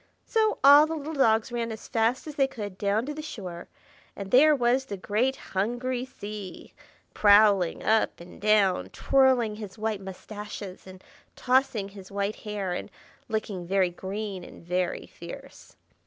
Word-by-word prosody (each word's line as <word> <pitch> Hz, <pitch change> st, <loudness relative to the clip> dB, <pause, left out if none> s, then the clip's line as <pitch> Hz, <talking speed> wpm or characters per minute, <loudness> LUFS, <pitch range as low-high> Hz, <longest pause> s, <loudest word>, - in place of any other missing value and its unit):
So 440 Hz, -1 st, +1 dB
all 285 Hz, +2 st, +9 dB
the 325 Hz, -, -3 dB
little 310 Hz, +1 st, -5 dB
dogs 225 Hz, -5 st, +2 dB
ran 235 Hz, -1 st, -2 dB
as 220 Hz, -, -8 dB
fast 230 Hz, +3 st, 0 dB
as 305 Hz, -, -7 dB
they 275 Hz, -2 st, +2 dB
could 210 Hz, -8 st, -7 dB
down 205 Hz, +4 st, 0 dB
to 295 Hz, -, -4 dB
the 310 Hz, -, -6 dB
shore; 185 Hz, -, -7 dB, 0.5 s
and 195 Hz, -1 st, -7 dB
there 300 Hz, +4 st, +7 dB
was 250 Hz, +1 st, +2 dB
the 200 Hz, -6 st, -6 dB
great 220 Hz, +8 st, 0 dB, 0.2 s
hungry 245 Hz, +6 st, -1 dB
Sea, 210 Hz, -6 st, -9 dB, 0.4 s
prowling 205 Hz, -4 st, +5 dB
up 220 Hz, 0 st, +2 dB
and 175 Hz, +1 st, -13 dB
down, 200 Hz, -, +3 dB
twirling 255 Hz, -5 st, +3 dB
his 210 Hz, -1 st, -8 dB
white 215 Hz, -2 st, -2 dB
moustaches 195 Hz, 0 st, -8 dB
and 185 Hz, 0 st, -12 dB, 0.3 s
tossing 250 Hz, -6 st, +1 dB
his 195 Hz, -1 st, -12 dB
white 200 Hz, +1 st, -2 dB
hair, 205 Hz, -4 st, -4 dB
and 180 Hz, -, -5 dB, 0.4 s
looking 205 Hz, -5 st, -3 dB
very 190 Hz, -1 st, +2 dB
green 195 Hz, +1 st, -5 dB
and -, -, -13 dB
very 180 Hz, 0 st, -1 dB
fierce. -, -, -12 dB
215 Hz, 155 wpm, -27 LUFS, 195-255 Hz, 0.5 s, all